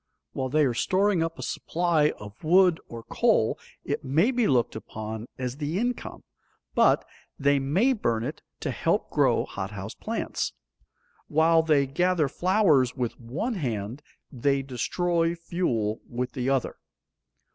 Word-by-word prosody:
While 130 Hz, -1 st, -2 dB
they 150 Hz, +2 st, +3 dB
are 125 Hz, -, +1 dB
storing 190 Hz, -, +2 dB
up 165 Hz, 0 st, -2 dB
a -, -, -6 dB
supply 165 Hz, -3 st, +1 dB
of 105 Hz, +5 st, -12 dB
wood 180 Hz, +1 st, +5 dB
or 115 Hz, -1 st, -8 dB
coal -, -, +2 dB, 0.3 s
it -, -, -2 dB
may 160 Hz, -, +2 dB
be 245 Hz, -4 st, +2 dB
looked 120 Hz, -4 st, +2 dB
upon 110 Hz, +1 st, -6 dB
as 125 Hz, 0 st, -4 dB
the 150 Hz, +3 st, -2 dB
income, 245 Hz, +3 st, -3 dB, 0.5 s
but -, -, +4 dB, 0.3 s
they 140 Hz, 0 st, +3 dB
may 180 Hz, -, +2 dB
burn 115 Hz, -, -1 dB
it 150 Hz, +6 st, -5 dB, 0.2 s
to -, -, -1 dB
help -, -, 0 dB
grow -, -, +3 dB
hothouse 100 Hz, +1 st, -6 dB
plants. -, -, -3 dB, 0.7 s
While 160 Hz, +2 st, +4 dB
they 150 Hz, -3 st, +3 dB
gather 170 Hz, +3 st, +1 dB
flowers 170 Hz, -, +3 dB
with 125 Hz, -4 st, -3 dB
one 135 Hz, -, -3 dB
hand, 120 Hz, -, -3 dB, 0.3 s
they 135 Hz, +1 st, +1 dB
destroy 165 Hz, +6 st, 0 dB
fuel 130 Hz, -, -1 dB
with 125 Hz, +1 st, -3 dB
the 130 Hz, 0 st, -2 dB
other. 135 Hz, -2 st, 0 dB
145 Hz, 145 wpm, -26 LUFS, 120-175 Hz, 0.7 s, wood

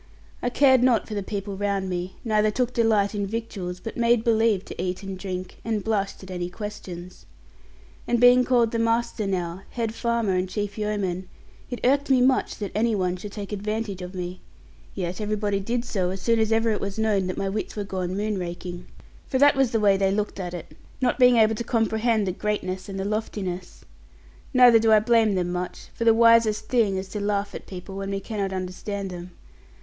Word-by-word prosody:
I 245 Hz, -, 0 dB
cared 260 Hz, 0 st, +5 dB
not 245 Hz, -3 st, +3 dB
for 220 Hz, -, -6 dB
the 205 Hz, -, -1 dB
people 200 Hz, 0 st, -4 dB
round 200 Hz, -1 st, -1 dB
me, 180 Hz, 0 st, -4 dB
neither 215 Hz, -1 st, +3 dB
took 250 Hz, +3 st, -1 dB
delight 220 Hz, -4 st, +2 dB
in 205 Hz, -1 st, -2 dB
victuals; 195 Hz, -5 st, -4 dB
but 225 Hz, -, -7 dB
made 235 Hz, -1 st, +3 dB
believe 225 Hz, -4 st, +2 dB
to -, -, -6 dB
eat 185 Hz, +2 st, -3 dB
and 195 Hz, -1 st, -5 dB
drink 185 Hz, -1 st, -6 dB
and 220 Hz, -3 st, -1 dB
blushed 200 Hz, -3 st, -1 dB
at 190 Hz, -, -9 dB
any 175 Hz, -1 st, -3 dB
questions. 185 Hz, -3 st, -8 dB, 0.8 s
And 240 Hz, -, +2 dB
being 245 Hz, +1 st, +7 dB
called 240 Hz, -3 st, +3 dB
the 230 Hz, -, -1 dB
master 230 Hz, -2 st, 0 dB
now, 180 Hz, -1 st, -2 dB
head 230 Hz, -2 st, -3 dB
farmer, 235 Hz, -4 st, 0 dB
and 185 Hz, 0 st, 0 dB
chief 205 Hz, 0 st, -3 dB
yeoman, 200 Hz, -4 st, -2 dB, 0.4 s
it 245 Hz, -, -5 dB
irked 280 Hz, +3 st, +2 dB
me 265 Hz, -1 st, +5 dB
much 255 Hz, +1 st, +2 dB
that 205 Hz, -2 st, -5 dB
any 225 Hz, +1 st, +1 dB
one 185 Hz, -2 st, 0 dB
should 200 Hz, +3 st, -8 dB
take 205 Hz, -1 st, -6 dB
advantage 210 Hz, -1 st, -3 dB
of 180 Hz, +1 st, -7 dB
me; 180 Hz, 0 st, -5 dB, 0.5 s
yet 180 Hz, +1 st, -3 dB
everybody 210 Hz, -1 st, -1 dB
did 235 Hz, +5 st, -2 dB
so 190 Hz, -6 st, -1 dB
as 190 Hz, +1 st, -4 dB
soon 230 Hz, +4 st, +2 dB
as 220 Hz, 0 st, +1 dB
ever 225 Hz, 0 st, +3 dB
it 210 Hz, -, -1 dB
was 200 Hz, +1 st, -4 dB
known 210 Hz, -4 st, +1 dB
that 185 Hz, -, -3 dB
my 195 Hz, -, -1 dB
wits 205 Hz, +2 st, -3 dB
were 210 Hz, -, -2 dB
gone 185 Hz, -1 st, -3 dB
moon 210 Hz, -1 st, -1 dB
raking. 175 Hz, 0 st, -6 dB, 0.4 s
For 260 Hz, -, 0 dB
that 285 Hz, +2 st, +6 dB
was 270 Hz, -2 st, +3 dB
the 225 Hz, -, 0 dB
way 200 Hz, -2 st, +4 dB
they 195 Hz, 0 st, +2 dB
looked 205 Hz, 0 st, -2 dB
at 180 Hz, -1 st, -4 dB
it, 170 Hz, -, -9 dB, 0.2 s
not 255 Hz, 0 st, +1 dB
being 250 Hz, -1 st, +6 dB
able 220 Hz, 0 st, +5 dB
to 220 Hz, -, -3 dB
comprehend 225 Hz, -1 st, +1 dB
the 185 Hz, -, 0 dB
greatness 190 Hz, -1 st, -3 dB
and 195 Hz, 0 st, -5 dB
the 190 Hz, -, -2 dB
loftiness. 200 Hz, -4 st, -4 dB, 0.7 s
Neither 245 Hz, -3 st, +7 dB
do 220 Hz, 0 st, +3 dB
I 215 Hz, -, +7 dB
blame 220 Hz, -2 st, +3 dB
them 175 Hz, -1 st, -1 dB
much; 180 Hz, 0 st, -5 dB
for 230 Hz, -, -3 dB
the 225 Hz, -, +7 dB
wisest 230 Hz, -2 st, +4 dB
thing 220 Hz, -6 st, +2 dB
is 190 Hz, 0 st, -4 dB
to 210 Hz, -, -4 dB
laugh 205 Hz, 0 st, -1 dB
at -, -, -8 dB
people 190 Hz, +1 st, -8 dB
when 195 Hz, 0 st, -4 dB
we 195 Hz, 0 st, -2 dB
cannot 200 Hz, -2 st, -3 dB
understand 190 Hz, +1 st, -4 dB
them. 175 Hz, 0 st, -8 dB
205 Hz, 210 wpm, -25 LUFS, 190-230 Hz, 0.8 s, being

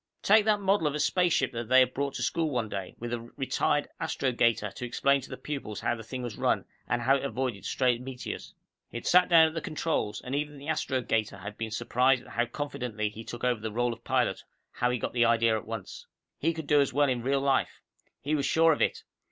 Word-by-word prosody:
Take 210 Hz, +1 st, +5 dB
that 215 Hz, -1 st, +3 dB
model 195 Hz, -4 st, +2 dB
of 145 Hz, -, -1 dB
a -, -, -2 dB
spaceship 160 Hz, -5 st, +2 dB
they 120 Hz, +2 st, +4 dB
had 130 Hz, 0 st, +2 dB
brought 140 Hz, 0 st, -2 dB
to -, -, -2 dB
school 165 Hz, -2 st, 0 dB
one 120 Hz, -6 st, -2 dB
day, 95 Hz, -3 st, -5 dB
with 120 Hz, 0 st, -5 dB
a 120 Hz, -, -1 dB, 0.2 s
retired 145 Hz, +2 st, 0 dB
astrogator 115 Hz, -8 st, +1 dB
to -, -, -9 dB
explain 140 Hz, +3 st, +2 dB
to 130 Hz, -, -11 dB
the -, -, -6 dB
pupils 135 Hz, -8 st, -5 dB
how -, -, +1 dB
the 115 Hz, -, -6 dB
thing 125 Hz, +3 st, -6 dB
was 120 Hz, -4 st, -6 dB
run, -, -, +1 dB, 0.2 s
and 120 Hz, 0 st, 0 dB
how 135 Hz, +3 st, +4 dB
it -, -, -6 dB
avoided 125 Hz, -6 st, -3 dB
stray 125 Hz, 0 st, +1 dB
meteors. 125 Hz, 0 st, -7 dB, 0.3 s
He -, -, -6 dB
had 120 Hz, -, -8 dB
sat 180 Hz, 0 st, +5 dB
down 165 Hz, -2 st, +7 dB
at -, -, -11 dB
the 165 Hz, -, -3 dB
controls, 155 Hz, -9 st, -2 dB
and 125 Hz, -, -7 dB
even 145 Hz, +1 st, -2 dB
the 140 Hz, +1 st, -10 dB
astrogator 125 Hz, -8 st, -1 dB
had 100 Hz, +1 st, -8 dB
been 115 Hz, 0 st, -4 dB
surprised 125 Hz, +3 st, +2 dB
at -, -, -15 dB
how 120 Hz, +3 st, 0 dB
confidently 125 Hz, -6 st, -3 dB
he 110 Hz, +2 st, -9 dB
took 120 Hz, +1 st, -8 dB
over 125 Hz, -3 st, +1 dB
the 110 Hz, 0 st, -4 dB
role 120 Hz, +2 st, 0 dB
of 115 Hz, +1 st, -14 dB
pilot, -, -, 0 dB, 0.3 s
how 120 Hz, -, 0 dB
he 125 Hz, -, 0 dB
got -, -, -4 dB
the 120 Hz, -1 st, +3 dB
idea 115 Hz, -1 st, +3 dB
at 110 Hz, -, -5 dB
once. 110 Hz, -4 st, -7 dB, 0.3 s
He 165 Hz, -, +2 dB
could 160 Hz, -2 st, -6 dB
do 145 Hz, 0 st, +4 dB
as 140 Hz, -, +1 dB
well 145 Hz, +2 st, +3 dB
in 125 Hz, -3 st, 0 dB
real 135 Hz, +3 st, +1 dB
life. 135 Hz, -1 st, 0 dB, 0.4 s
He 145 Hz, +3 st, -2 dB
was 145 Hz, -2 st, +1 dB
sure 165 Hz, 0 st, +5 dB
of -, -, -4 dB
it. -, -, 0 dB
130 Hz, 240 wpm, -28 LUFS, 115-145 Hz, 0.4 s, down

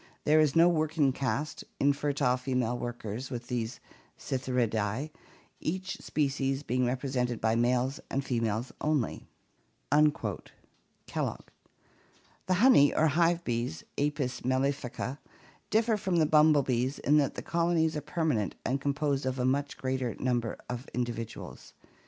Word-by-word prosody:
There 155 Hz, +1 st, +4 dB
is 150 Hz, -3 st, +3 dB
no 165 Hz, +1 st, +7 dB
working 155 Hz, -4 st, +2 dB
caste, 140 Hz, +3 st, -2 dB, 0.2 s
infertile 140 Hz, -2 st, +2 dB
female 125 Hz, -2 st, -1 dB
workers, 120 Hz, 0 st, -5 dB
with 120 Hz, -2 st, -6 dB
these 120 Hz, -1 st, -3 dB, 0.4 s
Psithyridae, 125 Hz, 0 st, -1 dB, 0.5 s
each 185 Hz, +3 st, -3 dB
species 135 Hz, -1 st, -1 dB
being 125 Hz, -1 st, 0 dB
represented 125 Hz, -2 st, -1 dB
by 110 Hz, 0 st, +2 dB
males 125 Hz, +4 st, +1 dB
and 135 Hz, 0 st, -2 dB
fe 125 Hz, -3 st, 0 dB
males 115 Hz, +2 st, -1 dB
only" 150 Hz, -6 st, -1 dB, 0.6 s
(Kellogg). 145 Hz, -, -2 dB, 1.0 s
The 185 Hz, -, +3 dB
honey 185 Hz, -, +6 dB
or 160 Hz, 0 st, +4 dB
hive 170 Hz, +3 st, +2 dB
bees, 115 Hz, -, -2 dB
Apis 140 Hz, -3 st, -1 dB
mellifica 130 Hz, 0 st, 0 dB
(Fig. -, -, -27 dB
39), 130 Hz, +3 st, -3 dB, 0.5 s
differ 220 Hz, 0 st, +2 dB
from 190 Hz, -3 st, -1 dB
the 160 Hz, -2 st, +4 dB
bumblebees 145 Hz, -4 st, +3 dB
in 150 Hz, +2 st, +3 dB
that 140 Hz, -2 st, +1 dB
the -, -, -5 dB
colonies 165 Hz, -2 st, +1 dB
are 150 Hz, -, -2 dB
permanent 150 Hz, -, -1 dB
and 135 Hz, +1 st, 0 dB
composed 140 Hz, -1 st, 0 dB
of 130 Hz, 0 st, -1 dB
a 125 Hz, -, 0 dB
much 140 Hz, +2 st, 0 dB
greater 130 Hz, -2 st, -2 dB
number 120 Hz, -3 st, -1 dB
of 125 Hz, +1 st, -5 dB
individuals. 120 Hz, -2 st, -5 dB
135 Hz, 135 wpm, -30 LUFS, 125-150 Hz, 1.0 s, no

